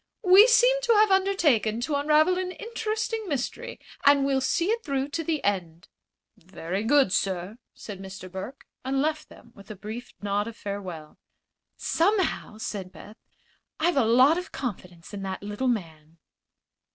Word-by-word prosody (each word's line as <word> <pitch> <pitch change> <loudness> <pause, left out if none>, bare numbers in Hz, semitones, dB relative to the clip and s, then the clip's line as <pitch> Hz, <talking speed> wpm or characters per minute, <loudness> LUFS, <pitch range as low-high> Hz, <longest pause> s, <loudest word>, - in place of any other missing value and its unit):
"We 390 +4 +8
seem - - +4
to 475 -2 +3
have 425 -1 +4
undertaken 320 - +2
to 295 +5 -2
unravel 305 +5 +3
an 365 0 -3
interesting 445 -1 -4
mystery, 320 - -4 0.2
and 280 -1 +5
we'll 270 -1 +1
see 335 +7 0
it 460 0 -1
through 275 -2 -2
to 330 +3 -3
the 315 -1 -2
end." 175 -4 -2 0.5
"Very 185 +2 -5
good, 265 -4 +3
sir," 190 +4 -2 0.2
said 200 -3 -9
Mr. 190 -1 -9
Burke, 190 +9 -8 0.2
and 265 +1 -1
left 305 +2 -1
them 235 - -17
with 200 - -16
a 215 - -7
brief 215 +5 -8
nod 205 +1 -1
of 230 0 -8
farewell. 185 -6 -7 0.6
"Somehow," 355 - 0
said 195 -4 -5
Beth, 210 +3 -13 0.6
"I've 340 +2 +2
a 275 - +4
lot 255 +9 +5
of 360 - -9
confidence 180 -8 -7
in 200 - -5
that 190 0 -5
little 210 +6 -3
man." 165 -8 -4
255 Hz, 160 wpm, -26 LUFS, -, 0.6 s, We